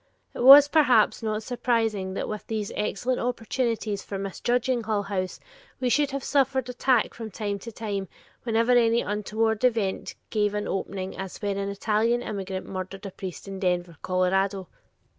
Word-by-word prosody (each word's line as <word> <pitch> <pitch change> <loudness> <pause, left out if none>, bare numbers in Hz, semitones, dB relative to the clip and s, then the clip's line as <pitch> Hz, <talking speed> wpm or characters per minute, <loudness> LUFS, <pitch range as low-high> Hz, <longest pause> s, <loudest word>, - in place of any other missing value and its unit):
It - - -8
was, 275 +3 +10
perhaps, 270 -9 +4
not 215 -1 -2
surprising 225 -6 -1
that - - -3
with 215 -1 -6
these 215 -2 -3
excellent 215 +4 -1
opportunities 230 -3 -2
for 200 - -6
misjudging 240 +6 -1
Hull 210 -2 0
House, 190 -2 -3 0.4
we 255 - 0
should 290 +3 +2
have 275 -1 -4
suffered 265 -2 +1
attack 250 +1 +1
from 225 -2 -7
time 205 0 -3
to 230 +4 -8
time 205 -3 -4 0.3
whenever 230 +1 +1
any 235 -1 +4
untoward 215 +2 -1
event 225 -6 0 0.2
gave 210 -1 +1
an 210 - -2
opening 190 0 -4
as 190 -1 -7
when 200 -2 -2
an 200 0 -2
Italian 220 +4 +1
immigrant 195 -3 -4
murdered 190 +1 -6
a 195 - -5
priest 185 0 -8
in 195 -1 -6
Denver, 180 -2 -1
Colorado. 190 +1 0
215 Hz, 160 wpm, -26 LUFS, 195-240 Hz, 0.4 s, was